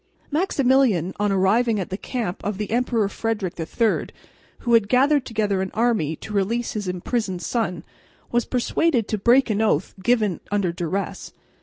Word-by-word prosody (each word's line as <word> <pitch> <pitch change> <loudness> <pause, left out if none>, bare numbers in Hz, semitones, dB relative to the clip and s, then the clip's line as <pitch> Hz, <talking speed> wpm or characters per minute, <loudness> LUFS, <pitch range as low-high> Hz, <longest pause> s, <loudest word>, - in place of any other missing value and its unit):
Maximilian, 265 - +2
on 205 -1 +1
arriving 210 +4 +2
at 185 - -4
the - - -1
camp 215 -3 -4
of 205 -1 -2
the 210 0 -4
Emperor 235 -3 +1
Frederick 210 -3 -2
III, 215 +7 0 0.5
who 235 - 0
had 225 -3 +4
gathered 275 +2 +3
together 210 -4 0
an 190 - -2
army 215 -10 +1
to 210 - -9
release 225 +4 0
his 205 -3 -4
imprisoned 185 +1 -2
son, 180 -9 -2 0.5
was 240 -1 +1
persuaded 250 -1 +1
to 215 - -2
break 240 +3 +4
an 210 +1 0
oath 220 - +1
given 210 -4 +1
under 200 -4 +1
duress. 175 +3 -4
215 Hz, 160 wpm, -23 LUFS, 190-240 Hz, 0.5 s, had